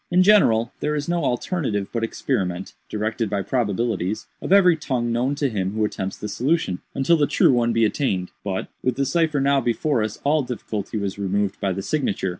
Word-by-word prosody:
In 180 +1 +4
general, 120 - +4
there 150 0 -1
is 145 -1 -3
no 170 0 0
alternative 120 - -1
but 115 -1 -1
experiment 95 -6 -2 0.2
(directed 110 +1 -2
by 100 -1 -1
probabilities) 105 -3 -1 0.2
of - - -5
every 185 -3 +6
tongue 125 -6 -2
known 125 +4 0
to 140 0 0
him 100 -5 -2
who 110 0 +1
attempts 95 -2 -4
the 105 - -5
solution, 130 - 0
until 150 +5 +3
the 145 -2 +2
true - - +4
one 120 -1 +2
be 115 -1 +3
attained. 95 -7 -1
But, 95 -2 -3
with 130 -1 0
the 140 +2 0
cipher 155 +1 +1
now 140 0 +3
before 120 +2 0
us, 110 -1 -3
all 150 +2 +3
difficulty 115 -5 -4
was 100 -1 -3
removed 100 0 -1
by 100 - 0
the 95 +1 -3
signature. 115 -8 -1
120 Hz, 200 wpm, -23 LUFS, 100-145 Hz, 0.2 s, every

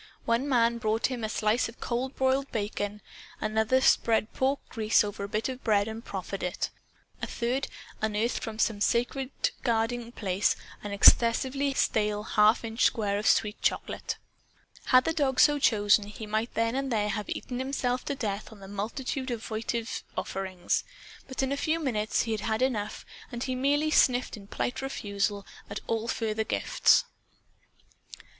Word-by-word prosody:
One 235 +5 +1
man 235 -2 +3
brought 225 +2 0
him 245 -3 -4
a 215 - -1
slice 220 +2 +1
of 230 - -14
cold 255 +3 -2
broiled 265 +1 +1
bacon. 205 -1 -3 0.4
Another 220 +4 +2
spread 225 -3 +3
pork 270 +2 +1
grease 220 -1 +2
over 205 -1 -5
a 200 - -5
bit 215 +2 -1
of 260 -1 -6
bread 205 -2 +3
and 220 +1 -6
proffered 195 -1 -5
it. 180 0 -2 0.5
A - - -2
third 250 +4 -1 0.3
unearthed 220 +2 0
from 220 -1 -5
some 220 -2 +1
sacredly 250 +4 0 0.3
guarded 230 0 +1
hiding 235 0 -9
place 195 -3 +1 0.3
an 205 - -6
excessively 260 +6 +4
stale 210 -3 +1
half 215 +2 +4
inch 225 +1 -1
square 205 -2 +2
of 215 - -1
sweet 210 0 +2
chocolate. - - -1 0.7
Had 255 0 +6
the 325 - 0
dog 275 -5 +1
so 295 -1 +6
chosen, 205 -4 +4
he 215 +1 -8
might 215 +2 -2
then 230 0 +1
and 270 0 -2
there 210 -2 +1
have 210 -1 -3
eaten 250 -1 -4
himself 255 -2 -1
to 280 - -2
death 215 -6 -3
on 215 - -13
the 195 - -10
multitude 250 +7 -3
of 235 -1 -4
votive 225 +1 -3
offerings. 190 -2 -2 0.4
But 265 0 -3
in 265 - 0
a - - +1
few 315 +3 0
minutes 220 -8 0
he 230 - -3
had 215 -2 -1
had 220 +3 0
enough, 215 -5 -2 0.3
and 240 0 -4
he 260 - -2
merely 290 +4 +1
sniffed 250 -4 +3
in 200 -2 -12
polite 245 +5 -3
refusal 205 -6 -2 0.2
at 205 - -4
all 225 0 -1
further 220 -2 -1
gifts. - - +3
225 Hz, 170 wpm, -28 LUFS, 210-255 Hz, 0.7 s, Had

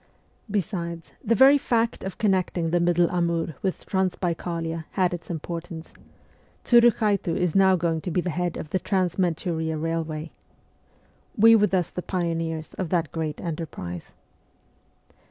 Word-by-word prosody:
Besides, 175 -5 -3
the 230 -1 +2
very 270 +4 +7
fact 230 -3 0
of 190 - -5
connecting 185 -5 0
the 175 - +3
middle 175 0 +3
Amur 170 -2 0
with 190 -2 -3
Transbaikalia 170 -3 -2
had 185 -2 +1
its 175 - -7
importance; 165 0 -6 0.7
Tsurukhaitu 215 -7 +4
is 180 -3 0
now 190 -1 +5
going 165 -2 -1
to 180 - -4
be 180 - 0
the 180 0 -1
head 175 +2 -2
of 155 - -7
the 185 - +1
Trans 185 -2 -1
Manchuria 160 -2 -1
railway. 160 0 -3 1.1
We 225 +2 +8
were 210 -1 +4
thus 185 -4 0
the 180 - -4
pioneers 165 -3 -3
of 185 -4 -2
that 170 -3 0
great 160 -2 -3
enterprise. 150 - -6
175 Hz, 140 wpm, -25 LUFS, 165-190 Hz, 1.1 s, We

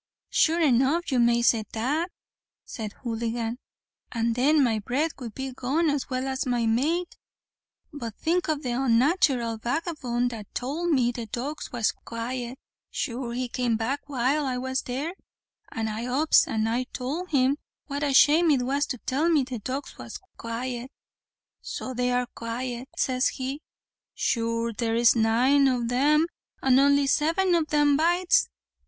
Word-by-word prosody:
"Sure 330 +2 +3
enough 285 +3 +2
you 255 - +2
may 235 0 +3
say 230 -2 +3
that," 290 +10 -1 0.6
said 215 -3 -6
Houligan; 230 0 -2 0.5
"and 230 -1 0
then 280 +5 +3
my 225 -4 +1
bread 270 +10 -1
would 235 -5 -7
be 265 0 -4
gone 290 +6 +1
as 285 -2 -2
well 255 0 -2
as 265 0 -2
my 240 -2 +1
mate. 305 +11 0 0.8
But 235 -7 -6
think 345 +1 0
o' 310 - +3
the 285 -4 -5
unnatharal 245 - +2
vagabone 245 -3 -1
that 220 -4 -9
towld 305 +8 -2
me 255 -6 +3
the 235 -2 -6
dogs 265 +8 -5
was 235 -3 +1
quite; 240 +2 -5 0.3
sure 240 -2 -3
he 250 +1 -2
came 240 -2 0
back 275 +6 -3
while 275 +3 +1
I 255 -1 -1
was 260 +1 -2
there, 275 +7 -4 0.6
and 225 -1 -2
I 220 +3 -4
ups 285 +5 +4
and 220 0 0
I 240 +3 0
towld 290 +9 -4
him 275 -1 +2 0.3
what 285 0 -4
a 290 -1 +1
shame 305 +5 +6
it 270 -4 +3
was 280 +3 0
to 255 - -3
tell 295 +6 +1
me 310 -5 +4
the 250 -2 -5
dogs 260 +6 -5
was - - -8 0.2
quite. 240 +2 -5 0.7
So 260 - -5
they 250 0 0
are 250 0 +1
quite, 240 +2 -5
says 255 0 +2
he; 270 +3 -4 0.5
sure 230 0 0
there's 230 +2 +3
nine 245 +5 +4
o' 250 -2 +1
them, 290 +6 +3 0.3
and 265 -1 +4
only 280 0 +4
seven 330 +7 +2
o' 340 - +4
them 295 -2 +3
bites. 350 +3 +3
255 Hz, 160 wpm, -26 LUFS, 235-290 Hz, 0.8 s, shame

